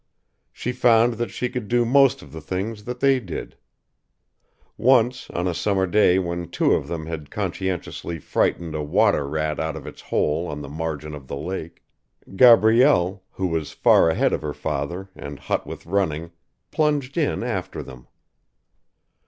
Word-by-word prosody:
She 125 - -4
found 120 -1 +4
that 115 -1 -3
she 125 - -3
could 125 -4 -5
do 120 +1 +2
most 135 +2 +4
of 70 - -14
the 80 +1 -8
things 100 +6 -4
that 125 0 -6
they 135 -1 +4
did. 95 -9 -7 1.2
Once, 125 0 +2
on 90 +1 -2
a 90 - 0
summer 95 +2 +1
day 95 -1 +4
when 85 -2 -3
two - - +1
of - - 0
them 80 -2 -4
had 80 -2 -6
conscientiously 95 -3 -3
frightened 80 +2 -1
a 75 - -2
water 75 -1 +2
rat 75 0 -2
out 80 -1 -2
of - - -8
its - - -10
hole 80 +4 0
on 75 0 -5
the 70 - -8
margin 75 0 -4
of 70 -3 -9
the 70 - -5
lake, 85 +1 -6 0.5
Gabrielle, 110 -4 +5
who 95 - -4
was 80 -4 -2
far - - +5
ahead 80 - +1
of - - -1
her 75 -1 -4
father 85 +7 -3
and 70 0 -8
hot - - -3
with - - -8
running, 85 -3 -1 0.4
plunged 145 -3 0
in 150 -7 0
after 105 -7 -4
them. 60 -1 -13
90 Hz, 170 wpm, -23 LUFS, 80-115 Hz, 1.2 s, Gabrielle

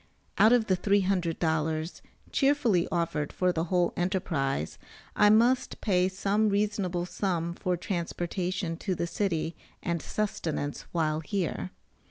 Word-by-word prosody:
Out 220 - +7
of 245 -2 +4
the 190 - +2
$300, 165 -5 0 0.3
cheerfully 265 - +3
offered 165 -4 -1
for 180 -1 +1
the 165 0 -1
whole 175 0 +1
enterprise, 160 - -1 0.4
I 210 - +6
must 235 +4 +3
pay 185 -3 +2
some 200 +3 +1
reasonable 200 -4 0
sum 175 -3 -2
for 180 0 -1
transportation 175 0 -2
to 185 +1 -2
the 170 - -1
city 170 -3 -1 0.3
and 170 -2 -1
sustenance 160 -8 -3
while 155 -2 0
here. 165 - -2
180 Hz, 125 wpm, -28 LUFS, 165-200 Hz, 0.4 s, Out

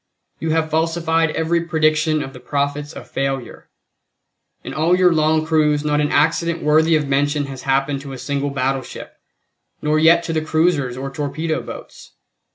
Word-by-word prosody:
You 160 - -3
have 160 0 0
falsified 165 0 +1
every 165 +1 +1
prediction 155 -1 +1
of 135 - -8
the - - -11
prophets 145 +1 -2
of - - -10
failure. 135 -2 -4 0.9
In - - -7
all 165 +4 +2
your 180 -2 +4
long 155 0 +2
cruise 150 -2 +2
not 150 0 +1
an 150 - 0
accident 165 +3 +1
worthy 160 +2 +4
of 150 -2 0
mention 145 +1 +1
has 135 -2 -8
happened 135 +1 0
to 140 -1 -9
a 135 - -7
single 140 +2 -2
battleship, 135 -1 -4 0.6
nor 155 +1 +1
yet 170 +2 +5
to 165 -1 -3
the 155 - 0
cruisers 155 -5 0
or 135 +1 -5
torpedo 150 +3 -3
boats. - - -11
155 Hz, 165 wpm, -20 LUFS, 140-160 Hz, 0.9 s, yet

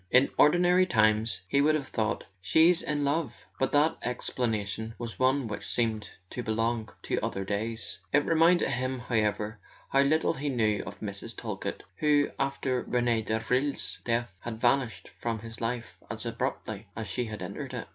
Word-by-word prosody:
In 130 +2 +5
ordinary 180 +3 +5
times 110 - +3
he 140 +9 +3
would 155 +2 +4
have 140 -3 -3
thought: 110 -1 -1 0.2
"She's 160 - +5
in 150 -1 -1
love 140 -3 -1
" - - -31
but 135 - +1
that 150 +2 +4
explanation 110 -3 -2
was 115 -2 -6
one 130 +1 +3
which 105 -2 -5
seemed 110 -3 0 0.2
to 125 - -3
belong 115 0 -1
to - - 0
other 95 0 -2
days. 110 +3 -2
It 145 +1 +3
reminded 165 +2 +4
him, 130 +1 -1
however, 110 -3 -1 0.3
how 135 - +4
little 155 +4 +3
he 145 -1 -3
knew 110 -5 +1
of - - -8
Mrs. 100 -2 -5
Talkett, - - -4
who, 145 -1 +3
after 135 -2 0
Rene 120 -2 +1
Davril's 125 +6 -1
death, 120 -4 0
had 115 -2 -5
vanished 120 0 +1
from 115 -1 -1
his 115 +1 -9
life 115 -6 -3
as 105 +2 -5
abruptly 115 -3 -3
as 110 0 -4
she 125 - -1
had 110 -1 -6
entered - - -6
it. - - -5
120 Hz, 170 wpm, -29 LUFS, 110-140 Hz, 0.3 s, In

